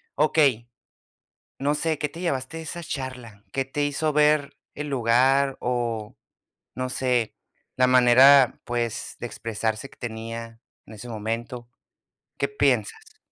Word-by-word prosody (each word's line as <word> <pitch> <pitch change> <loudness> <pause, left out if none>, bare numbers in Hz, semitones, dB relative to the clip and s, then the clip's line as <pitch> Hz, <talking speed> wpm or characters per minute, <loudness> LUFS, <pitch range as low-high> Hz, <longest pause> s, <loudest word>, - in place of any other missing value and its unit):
Okey, 140 -6 +2 0.9
no 145 +2 +1
sé, 160 0 -1
¿qué 150 - -1
te 165 +4 -10
llevaste 140 -2 -2
de - - -6
esa 170 +2 -6
charla? 125 -8 -7
¿Qué 135 -1 -1
te 145 +2 -1
hizo 145 +2 -1
ver 150 -1 +3 0.2
el 150 0 -5
lugar, 135 +2 +3
o 120 -3 -2 0.6
no 130 0 -3
sé, 125 -4 0 0.4
la 130 0 +4
manera, 130 +1 +6
pues, 120 -1 -3
de - - -3
expresarse 115 +1 -3
que - - -19
tenía 115 0 -7 0.3
en 110 - -12
ese 110 +3 -10
momento? 115 +2 -4 0.7
¿Qué - - 0
piensas? 440 +1 -1
130 Hz, 135 wpm, -25 LUFS, 115-145 Hz, 0.9 s, manera